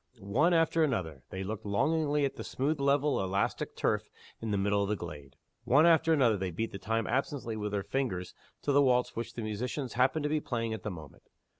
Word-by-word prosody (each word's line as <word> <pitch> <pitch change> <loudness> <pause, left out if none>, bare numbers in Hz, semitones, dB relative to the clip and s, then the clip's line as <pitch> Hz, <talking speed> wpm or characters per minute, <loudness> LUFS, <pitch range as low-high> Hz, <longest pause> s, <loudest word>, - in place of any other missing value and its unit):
One 120 - +2
after 165 -1 +3
another 80 - -1
they 95 0 -5
looked 110 +2 -5
longingly 145 +7 +1
at 135 - -3
the - - -6
smooth 145 +3 -1
level 140 +1 +2
of 95 - 0
elastic 100 +1 -1
turf - - 0 0.3
in 115 - -3
the 105 - +1
middle 100 +1 +2
of 100 - -1
the 105 - +1
glade. 75 -7 -9 0.3
One 145 +6 +5
after 165 -1 +5
another 125 -9 +4
they 95 -1 -2
beat 100 +3 -4
time 115 +1 0
absently 130 -2 -1
with 105 -1 -3
their 100 -1 -1
fingers 100 -7 -2 0.3
to 145 - +1
the 140 +1 +5
waltz 125 -2 +2
which 115 0 -5
the 115 - -4
musicians 120 +5 -3
happened 130 +5 +2
to - - +1
be 155 0 +1
playing 115 -4 -2
at 110 - -5
the 105 - -4
moment. 80 -7 -11
115 Hz, 215 wpm, -31 LUFS, 100-140 Hz, 0.3 s, One